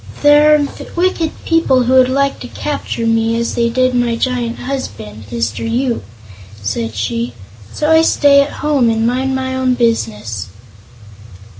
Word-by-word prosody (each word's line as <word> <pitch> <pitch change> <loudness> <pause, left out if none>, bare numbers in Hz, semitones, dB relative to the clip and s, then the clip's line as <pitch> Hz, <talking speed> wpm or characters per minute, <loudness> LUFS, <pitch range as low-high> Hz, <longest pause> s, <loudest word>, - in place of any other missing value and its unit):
"There 295 +1 +6
are 290 -1 +1 0.3
wicked 345 -2 +1 0.2
people 275 -6 +2
who 250 +2 +1
would 255 -1 +5
like 275 +1 0
to 250 - -8
capture 265 -4 -4
me, 225 0 +1
as 235 0 -2
they 235 0 +1
did 255 +2 +1
my 245 -1 +1
giant 240 -1 -2
husband, 110 - -6
Mr. 115 -2 -2
Yoop," 240 +1 -1 0.6
said 110 +2 -3
she; 115 +3 -3 0.4
"so 300 - -1
I 320 0 +6
stay 285 -3 +4
at 280 - -1 0.2
home 280 -6 +3
and 225 0 0
mind 260 +2 0
my 260 0 -2
own 260 -1 +1
business." 110 - -1
245 Hz, 155 wpm, -16 LUFS, 225-275 Hz, 0.6 s, There